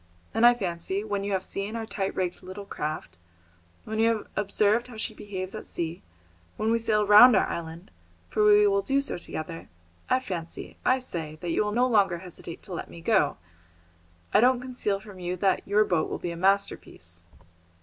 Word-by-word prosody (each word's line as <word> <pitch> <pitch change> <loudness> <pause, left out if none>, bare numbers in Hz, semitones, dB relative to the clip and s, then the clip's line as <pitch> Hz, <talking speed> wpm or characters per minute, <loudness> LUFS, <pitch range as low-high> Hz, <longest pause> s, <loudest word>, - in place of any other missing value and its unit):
And 235 - +6
I 240 - +6
fancy, 190 -1 -2
when 205 -2 -2
you 200 - -2
have 190 -1 0
seen 200 +4 -4
our 225 -1 -3
tight 200 -2 -3
rigged 180 -1 -2
little 185 +2 -8
craft, 150 - -5 0.6
when 220 0 -4
you 225 - +4
have 225 -2 -1
observed 210 +3 +2
how 240 -3 -11
she 220 - -3
behaves 190 -3 -6
at 215 - -7
sea, 170 0 -3 0.6
when 220 +1 0
we 230 - +2
sail 215 -2 +2
round 210 +4 +9
our 190 - +4
island, 165 - -6 0.4
for 215 - +1
we 210 0 +6
will 200 -1 +3
do 270 +7 +1
so 275 - -1
together 165 0 -6 0.4
I 255 - +4
fancy, 175 -9 -6
I 255 - +4
say, 165 -11 -5
that 175 - -2
you 165 - +2
will 210 - -2
no 245 +4 +3
longer 200 -7 +3
hesitate 170 -1 -9
to 190 - -8
let 170 - -5
me - - -11
go. 190 -4 +2 1.0
I - - +6
don't 250 +2 +4
conceal 245 -6 -2
from 200 -2 -12
you 180 0 -3
that 190 +1 +1
your 210 +2 +4
boat 170 -5 0
will - - -3
be 175 - -4
a - - -5
masterpiece." 175 - -1
200 Hz, 200 wpm, -27 LUFS, 175-220 Hz, 1.0 s, round